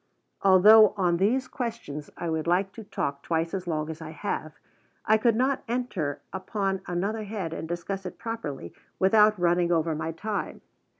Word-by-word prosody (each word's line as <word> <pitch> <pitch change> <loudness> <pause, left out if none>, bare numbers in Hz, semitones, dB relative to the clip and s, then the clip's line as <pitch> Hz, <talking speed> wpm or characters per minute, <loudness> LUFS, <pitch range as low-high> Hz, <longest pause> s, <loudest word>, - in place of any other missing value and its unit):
Although 205 +3 +7
on 175 -3 +2
these 240 +8 +1
questions 230 - -5
I 170 - -4
would 160 0 -2
like 185 +3 +2
to 225 +2 -10
talk 140 -8 -3
twice 165 +1 -1
as 185 -2 -4
long 155 -2 -1
as 160 +1 -9
I 160 - -7
have, 155 -2 -4 0.5
I 220 +1 +4
could 230 0 +3
not 260 +3 +1
enter 225 - -2
upon 195 0 -2
another 200 +5 -2
head 195 -6 -4
and 160 - -5
discuss 190 +3 -4
it - - -9
properly 150 - -5 0.2
without 210 +2 +5
running 175 0 +2
over 165 -1 +1
my 160 +1 -3
time. 205 +5 -4
190 Hz, 170 wpm, -27 LUFS, 165-215 Hz, 0.5 s, Although